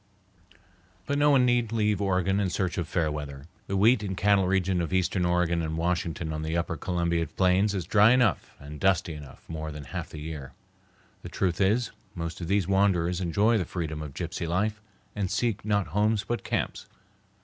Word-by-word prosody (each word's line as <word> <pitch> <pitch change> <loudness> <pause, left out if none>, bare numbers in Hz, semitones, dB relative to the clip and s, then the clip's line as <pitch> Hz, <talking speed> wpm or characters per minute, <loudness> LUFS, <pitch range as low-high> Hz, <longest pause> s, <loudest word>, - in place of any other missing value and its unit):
But 145 0 -1
no 145 0 +5
one 135 -3 +5
need 120 -2 +2
leave 105 -3 +1
Oregon 95 0 +1
in 100 -2 +1
search 90 +1 -1
of 85 - -2
fair 80 -2 0
weather. 70 -2 -6 0.2
The 100 - -1
wheat 110 +3 +5
and 95 -3 -4
cattle 100 -2 +3
region 95 -1 +1
of 85 - -3
eastern 95 -1 +1
Oregon 85 -1 +1
and 80 0 -3
Washington 85 -1 -1
on 75 - -3
the 80 +2 -1
upper 85 -1 -1
Columbia 85 0 -1
plains 95 +4 +2
is 90 -4 -2
dry 105 +3 +5
enough 125 -6 +2
and 75 +1 -9
dusty 95 -3 +2
enough 75 -2 -12
more 80 -1 -5
than 75 -1 -7
half 60 - -6
the 75 - -8
year. 75 -3 -7 0.7
The - - -8
truth 90 -2 -1
is, 110 +5 +2 0.2
most 85 0 -5
of 85 - -4
these 100 -1 +1
wanderers 95 -3 +2
enjoy 105 +6 +2
the - - 0
freedom 80 -3 -4
of 75 -3 -7
gypsy 85 - -4
life 105 +5 -1 0.3
and 100 -3 -1
seek 115 0 -1
not 100 -4 0
homes 105 +4 +1
but 120 - -2
camps. - - -3
90 Hz, 195 wpm, -27 LUFS, 80-100 Hz, 0.7 s, no